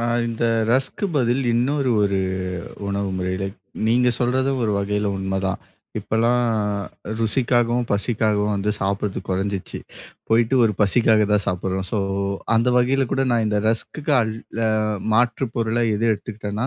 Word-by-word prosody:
அ - - -2 0.2
இந்த 115 0 -2 0.3
ரஸ்க்கு 135 - 0
பதில் 125 -2 +2
இன்னொரு 130 +3 +1
ஒரு 100 -1 +1 0.7
உணவு 100 0 -1
முறையில 95 +1 -2 0.4
நீங்க 125 +2 +3
சொல்றது 130 +2 +1
ஒரு 110 - +1
வகையில 105 +1 -1
உண்மைதான். 95 0 -2 0.4
இப்பல்லாம் 120 +2 +1 0.7
ருசிக்காகவும், 120 +1 +1
பசிக்காகவும் 105 -1 +1
வந்து 100 +1 0
சாப்பிடுறது 100 0 -2
குறைஞ்சிச்சு. 95 0 -2 0.5
போய்ட்டு 115 +3 +3
ஒரு 110 - +2
பசிக்காக 110 +1 +4
தான் 105 -1 +2
சாப்பிடுறோம். 95 +1 -2
ஸோ 110 - 0 0.6
அந்த 115 +2 +3
வகையில 130 +2 +2
கூட 135 - +1
நான் 115 -2 +2
இந்த 105 -1 +1
ரஸ்க்குக்கு 145 +7 -2
அல் 110 -1 -1 0.3
அ - - +3 0.5
மாற்று 120 +3 +2
பொருளா 115 0 0
எது 110 +3 0
எடுத்துக்கிட்டேன்னா, 105 +1 -4
110 Hz, 135 wpm, -22 LUFS, 100-120 Hz, 0.7 s, பசிக்காக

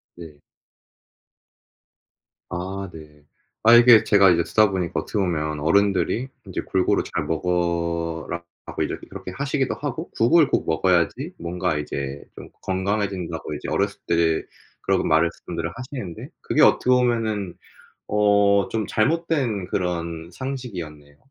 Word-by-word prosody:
네. 80 -4 -11 2.1
아 95 +2 -5
네. 75 -2 -14 0.4
아 115 +2 +7
이게 120 -2 +8
제가 100 -2 +6
이제 85 -1 +2
듣다 110 +2 +3
보니까 90 -3 -2
어떻게 105 - -3
보면 75 -5 -1
어른들이 100 - +1 0.2
인제 - - -4
"골고루 95 -1 +1
잘 - - -3
먹어라."라고 85 0 -3
이제 - - -2
그렇게 90 - -8
하시기도 135 +4 -1
하고 150 +3 -5
"국을 150 +6 +4
꼭 - - 0
먹어야지 85 +1 +1
뭔가 85 -1 -2
이제 70 -1 -4
좀 - - -11
건강해진다."고 95 -3 -2
이제 - - -7
어렸을 - - -1
때 85 -1 +2 0.4
그런 - - +1
말씀들을 85 +1 0
하시는데 125 - -7
그게 - - +1
어떻게 - - +4
보면은 115 -7 +1 0.5
어 100 -1 +3
좀 110 -2 -2
잘못된 135 - 0
그런 85 -3 -3
상식이었네요. 90 - -7
90 Hz, 285 characters per minute, -23 LUFS, 85-110 Hz, 2.1 s, 이게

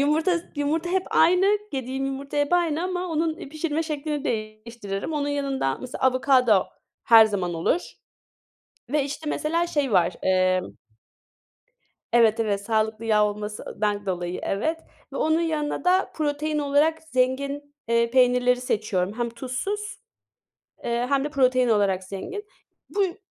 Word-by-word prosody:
yumurta, 310 +5 +2 0.2
yumurta 315 +4 -1
hep 380 0 +1
aynı, 365 +5 +4
yediğim 265 0 -3
yumurta 275 +1 -5
hep 290 +3 +1
aynı 335 -2 +2
ama 365 0 -2
onun 320 -2 -2
pişirme 310 +1 -2
şeklini 300 -1 -3
değiştiririm. 215 +1 -4
Onun 290 -1 -1
yanında, 275 - -1
mesela, 255 0 -7
avokado 255 -5 +4 0.4
her 225 -1 +8
zaman 190 -5 -2
olur 170 - +1 1.1
ve 295 0 +1
işte 295 +2 -5
mesela 335 +3 0
şey 285 -8 -1
var, 175 -2 +3
emm. 185 -1 +1 1.4
Evet, 230 -2 +4
evet, 205 -3 0
sağlıklı 220 +1 -1
yağ 210 -1 +4
olmasından 210 0 -3
dolayı, 180 -1 -3
evet 315 +12 -1 0.3
ve - - -3
onun 315 +1 +2
yanına 310 -3 -1
da 365 +2 +2
protein 300 0 -1
olarak 295 +3 +2
zengin, 280 +1 -1
eee, 235 0 +2
peynirleri 250 0 +3
seçiyorum. 205 -5 -1
Hem 235 - 0
tuzsuz, 265 - -4 0.8
eee, 235 +1 0
hem 275 -1 +2
de 295 - -2
protein 255 -3 +2
olarak 200 -3 +2
zengin. 375 - -6 0.4
Bu 405 - +1
yü 360 -1 -3
270 Hz, 135 wpm, -24 LUFS, 215-310 Hz, 1.4 s, her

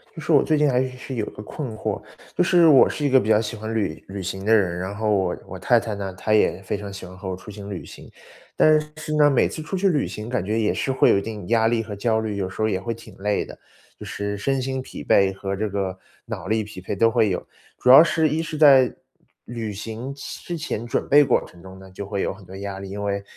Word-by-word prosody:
就 160 - -7
是 165 - -2
我 145 - +6
最 155 - +1
近 150 -1 +3
还 125 0 +2
是 130 - -3
是 130 +1 -7
有 110 -3 -1
一 - - -8
个 - - -9
困 115 +2 -6
惑， - - -3 0.3
就 - - +3
是 175 -2 +5
我 145 -4 +7
是 150 - -4
一 - - +3
个 130 0 +6
比 110 - -3
较 105 -1 +5
喜 115 +1 -4
欢 110 +1 -5
旅 100 -8 -2
旅 95 0 -6
行 95 +1 -5
的 110 - +4
人， 95 -5 +2
然 95 +3 -4
后 110 +1 -1
我 95 -3 +1
我 95 - -8
太 120 +5 +4
太 110 -2 -4
呢， 100 -2 -5
她 110 - -1
也 105 -3 +3
非 100 +1 -3
常 100 0 -7
喜 95 -1 -8
欢 90 +1 -12
和 95 +1 -6
我 95 - -3
出 95 +3 -13
行 100 -1 -9
旅 95 -4 -6
行。 - - -13 0.4
但 155 0 +5
是 150 - -7
是 155 0 -4
呢， 150 -1 +5
每 135 - +3
次 155 - -6
出 160 - -4
去 195 +1 +2
旅 150 -5 +1
行， 105 +2 -7
感 125 -7 -1
觉 110 +3 0
也 110 - +1
是 135 - -1
会 130 - +4
有 - - +5
一 - - 0
定 105 -3 -7
压 115 0 +3
力 115 0 +1
和 110 -2 -7
焦 110 +2 +1
虑， 110 -2 -3
有 95 -2 -2
时 - - -12
候 - - +3
儿 - - 0
也 95 - -1
会 115 +4 -3
挺 115 - -14
累 105 +1 0
的， - - -11 0.4
就 - - -9
是 100 0 -4
身 135 +5 0
心 130 0 -3
疲 - - -9
惫 95 -1 +3
和 95 0 -4
这 110 +2 -2
个 95 -2 -3 0.3
脑 100 -6 -6
力 110 +2 +1
疲 105 -2 -10
惫 95 - -4
都 115 +4 +4
会 110 -1 +2
有。 90 - -3 0.3
主 125 - +1
要 135 +5 +11
是 160 -1 +2
一 160 +2 -1
是 165 -1 -6
在 135 -4 +6 0.5
旅 115 -3 -5
行 115 +6 -6
前 140 - -8
之 175 - -4
前 135 -7 -4
准 120 - -2
备 145 +1 +7
过 - - +2
程 85 - -17
中 95 0 -11
呢， 95 0 -13
就 95 +2 -7
会 100 0 -3
有 - - -1
很 95 0 -13
多 95 - -11
压 100 0 -5
力， 95 0 -8
因 100 +1 -5
为 100 -1 -2
110 Hz, 310 characters per minute, -23 LUFS, 100-130 Hz, 0.5 s, 要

